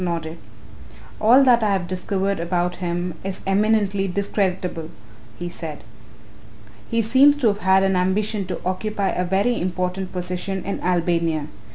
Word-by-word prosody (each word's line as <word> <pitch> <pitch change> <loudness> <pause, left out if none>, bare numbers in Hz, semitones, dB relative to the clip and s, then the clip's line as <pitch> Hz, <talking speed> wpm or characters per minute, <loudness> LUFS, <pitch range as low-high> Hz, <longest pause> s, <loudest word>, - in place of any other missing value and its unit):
nodded. 165 -2 -3 0.8
"All 245 +6 +6
that 245 -3 +5
I 210 -2 +2
have 180 -3 -1
discovered 190 +1 -2
about 175 +1 -1
him 175 0 -2
is 195 -1 -5
eminently 200 0 +2
discreditable," 185 -4 -2 0.5
he 175 - -5
said. 165 -3 -7 1.1
"He 230 -1 +1
seems 270 +6 +5
to 265 -5 +2
have 205 0 -2
had 190 0 +4
an 195 -1 +2
ambition 195 +2 0
to 185 - -4
occupy 195 +2 -1
a 180 - -1
very 200 +7 +1
important 180 +1 -2
position 180 +1 -3
in 200 - -3
Albania. 170 -3 0
190 Hz, 145 wpm, -22 LUFS, 175-205 Hz, 1.1 s, All